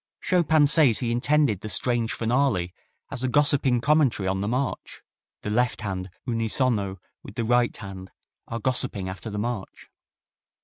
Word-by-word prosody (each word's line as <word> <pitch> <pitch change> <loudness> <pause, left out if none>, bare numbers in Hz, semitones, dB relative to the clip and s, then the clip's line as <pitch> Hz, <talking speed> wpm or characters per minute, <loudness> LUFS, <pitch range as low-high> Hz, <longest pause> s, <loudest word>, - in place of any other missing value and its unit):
Chopin 160 -4 +3
says 145 -6 +4
he 120 -2 -1
intended 130 -3 +2
the 110 - -6
strange 115 +3 0
finale 115 -7 0 0.4
as 125 - -1
a - - +1
gossiping 135 -2 +3
commentary 140 -9 +2
on 95 +1 -1
the 100 - -2
march. 130 +4 -3 0.4
"The 105 - -3
left 120 +1 0
hand 95 -2 -4 0.2
unisono 115 -4 0 0.2
with 100 - -12
the 115 - -1
right 120 +1 +2
hand 95 -1 -9 0.4
are 115 - -4
gossiping 120 -5 -1
after 95 +4 -7
the 105 - -5
march." 105 -2 -5
120 Hz, 150 wpm, -25 LUFS, 100-130 Hz, 0.4 s, says